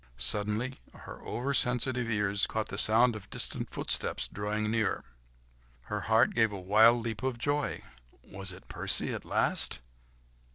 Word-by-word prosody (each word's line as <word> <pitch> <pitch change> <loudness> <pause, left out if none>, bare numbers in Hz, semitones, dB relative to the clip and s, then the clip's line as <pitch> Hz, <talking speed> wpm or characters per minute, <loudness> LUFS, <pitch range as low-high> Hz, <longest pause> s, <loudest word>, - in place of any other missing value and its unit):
Suddenly 105 - -1 0.2
her - - -11
over 135 +4 -3
sensitive 125 -1 +1
ears 105 -2 0
caught 110 -1 -3
the 100 - -2
sound 115 +2 +6
of 100 -2 -10
distant - - -1
footsteps - - -1
drawing 105 +1 -3
near; 110 -3 -1 0.8
her 105 +11 -5
heart 110 0 +4
gave 115 -2 +2
a 100 - -6
wild 110 +5 +4
leap 110 -2 -4
of 130 -2 -2
joy! 145 +4 -2 0.4
Was 95 -1 -4
it 90 - -13
Percy - - +1
at - - -6
last? - - +1
110 Hz, 150 wpm, -29 LUFS, 105-120 Hz, 0.8 s, sound